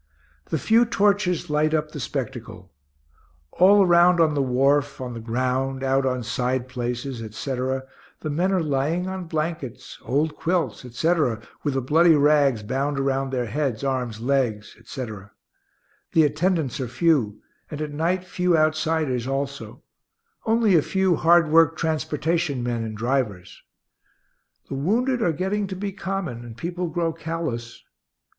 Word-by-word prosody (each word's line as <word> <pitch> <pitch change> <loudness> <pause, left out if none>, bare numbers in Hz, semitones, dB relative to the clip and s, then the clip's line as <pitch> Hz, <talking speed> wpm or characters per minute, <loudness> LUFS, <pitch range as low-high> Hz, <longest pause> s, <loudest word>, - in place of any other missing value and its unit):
The - - -2
few 230 +2 +4
torches 205 -6 +1
light 155 +1 +1
up 155 0 -1
the 150 - -7
spectacle. 120 -7 -6 0.8
All 200 +3 +6
around 175 0 +5
on 160 -2 +4
the 145 - +1
wharf, 135 +2 +1
on 125 -2 -5
the 115 - -6
ground, 130 +3 -1
out 135 0 +2
on 125 -1 -1
side 125 +2 -1
places, 125 0 -4
etc., 130 +4 -3 0.4
the 155 - -3
men 175 +6 +1
are 185 -3 +1
lying 150 +5 0
on 190 -1 -4
blankets, 155 -5 -4
old 145 +4 0
quilts, 175 -5 -1
etc., 125 -2 0 0.2
with 145 -3 -1
the 135 - +1
bloody 160 +5 +5
rags 145 -6 +3
bound 135 +5 -1
around 135 0 0
their 125 -2 -1
heads, 130 -1 -2
arms, 125 -5 -2
legs, 120 -4 -1
etc. 110 -4 -8 0.8
The 160 - +5
attendants 155 -2 0
are 130 - -2
few, 130 -6 +1 0.3
and 150 - -6
at 155 -1 -3
night 170 +5 0
few 180 -1 +1
outsiders 155 -5 0
also 140 +1 -4 0.6
only 225 -2 +3
a 160 - +6
few 190 +2 +1
hard 170 +1 +4
worked 165 0 +5
transportation 160 -2 -1
men 120 -1 -2
and 110 -1 -6
drivers. 110 -7 -2 1.1
(The - - -6
wounded 235 - 0
are 175 - +2
getting 190 +5 -1
to 190 - -5
be 200 +2 -4
common, 190 - -4
and 115 -1 -10
people 175 +6 -3
grow 165 0 -1
callous.) 160 -8 -5
145 Hz, 150 wpm, -24 LUFS, 125-170 Hz, 1.1 s, All